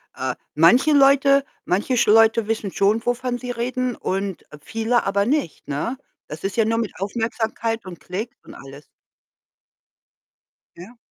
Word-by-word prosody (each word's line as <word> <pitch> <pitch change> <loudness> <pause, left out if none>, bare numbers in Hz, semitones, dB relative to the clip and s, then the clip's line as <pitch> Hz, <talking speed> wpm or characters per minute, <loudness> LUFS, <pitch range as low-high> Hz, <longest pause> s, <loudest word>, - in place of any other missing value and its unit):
äh, 130 -1 -3 0.2
manche 175 - +5
Leute 275 0 +5 0.2
manche 210 +8 0
sch 235 - +2
Leute 225 0 +5
wissen 215 -3 -2
schon, 210 +3 +1
wovon 245 0 -1
sie 250 0 -6
reden 250 +1 -2
und 195 -1 -3 0.2
viele 225 +5 0
aber 200 +1 +1
nicht, 275 - -2
ne? 145 - -3 0.3
Das 155 +1 -9
ist 195 +2 -3
ja 225 - +3
nur 225 +1 0
mit 225 -3 -2
Aufmerksamkeit 225 +2 -3
und 180 -2 -9
Klicks 210 +7 -6
und - - -13
alles. 135 +2 -12 1.9
Ja. 195 +8 -12
225 Hz, 145 wpm, -22 LUFS, 195-245 Hz, 1.9 s, manche